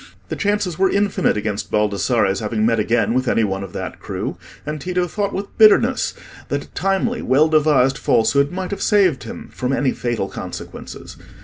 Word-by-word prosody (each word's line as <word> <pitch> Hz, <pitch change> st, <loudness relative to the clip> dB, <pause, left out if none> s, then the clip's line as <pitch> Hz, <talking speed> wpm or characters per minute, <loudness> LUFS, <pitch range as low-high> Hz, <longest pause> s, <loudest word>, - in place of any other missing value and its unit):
The -, -, -2 dB
chances 205 Hz, -4 st, -1 dB
were 190 Hz, 0 st, +4 dB
infinite 200 Hz, -, +1 dB
against 105 Hz, -1 st, -3 dB
Baldassarre's 105 Hz, -1 st, +1 dB
having 110 Hz, 0 st, -1 dB
met 115 Hz, 0 st, +2 dB
again 115 Hz, 0 st, +1 dB
with 130 Hz, +1 st, 0 dB
any 115 Hz, -, +2 dB
one 95 Hz, -1 st, -2 dB
of 95 Hz, -, -8 dB
that -, -, -6 dB
crew, -, -, -4 dB, 0.3 s
and 150 Hz, 0 st, -4 dB
Tito 180 Hz, +1 st, -1 dB
thought 200 Hz, +3 st, -2 dB
with 200 Hz, +1 st, -6 dB
bitterness 235 Hz, +4 st, +5 dB, 0.3 s
that -, -, -2 dB
a -, -, -16 dB
timely, 195 Hz, +5 st, -1 dB
well 140 Hz, +5 st, +3 dB
devised 150 Hz, -4 st, +3 dB
falsehood 140 Hz, +6 st, +2 dB
might 185 Hz, +1 st, -4 dB
have 200 Hz, -, -4 dB
saved 190 Hz, -9 st, +2 dB
him -, -, -9 dB
from 125 Hz, +1 st, -2 dB
any 135 Hz, -1 st, +1 dB
fatal 120 Hz, -5 st, -2 dB
consequences. -, -, -8 dB
140 Hz, 180 wpm, -20 LUFS, -, 0.3 s, bitterness